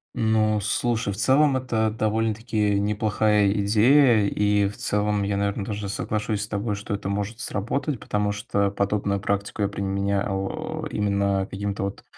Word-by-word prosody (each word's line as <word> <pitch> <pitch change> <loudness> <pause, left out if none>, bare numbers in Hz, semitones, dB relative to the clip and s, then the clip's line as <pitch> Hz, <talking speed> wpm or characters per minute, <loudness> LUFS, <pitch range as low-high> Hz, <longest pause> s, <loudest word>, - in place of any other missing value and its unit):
Ну 110 -1 +2
слушай, 110 0 0
в - - -7
целом 135 +3 +3
это 115 -4 0
довольно-таки 110 -1 0
неплохая 105 0 +2
идея. 110 +3 +4
И 105 0 +2
в 105 - -7
целом 105 0 0
я, 100 0 -1
наверно, 100 0 -1
даже 105 -1 -4
соглашусь 105 +1 -2
с - - -5
тобой, 105 0 -2
что 100 +1 -5
это 100 -1 -5
может 105 +3 -3
сработать. 120 +4 -2
Потому 105 0 -1
что 100 -1 -1
подобную 100 0 0
практику 100 +1 -2
я 100 - +2
применял, 100 0 -2
э, - - -5
именно 100 -1 0
к - - -17
каким-то 100 +1 -3
вот 100 0 -5
105 Hz, 160 wpm, -24 LUFS, 100-110 Hz, -, идея